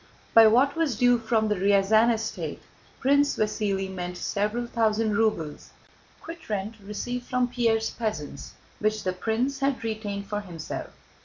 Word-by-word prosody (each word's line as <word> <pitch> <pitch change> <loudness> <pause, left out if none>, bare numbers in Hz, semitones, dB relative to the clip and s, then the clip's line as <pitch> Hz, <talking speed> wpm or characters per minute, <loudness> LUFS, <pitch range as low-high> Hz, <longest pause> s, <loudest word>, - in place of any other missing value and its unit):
By 225 -1 +9
"what 260 +6 +4
was 325 -7 0
due 245 +2 +4
from 220 -1 +1
the 210 - +2
Ryazán 200 +4 +4
estate" 225 -1 -3 0.4
Prince 285 +2 +3
Vasíli 205 -2 0
meant 180 -1 -5
several 210 +6 -1
thousand 220 -2 +1
rubles 200 -9 -1 0.5
quitrent 220 - -5
received 245 +5 -5
from 250 0 +1
Pierre's 230 -2 +1
peasants, 160 -12 -5 0.3
which 215 0 0
the 185 - -1
prince 230 +8 -1
had 275 -2 0
retained 210 -3 -4
for 205 +1 -3
himself. 170 -6 -6
220 Hz, 140 wpm, -26 LUFS, 200-240 Hz, 0.5 s, By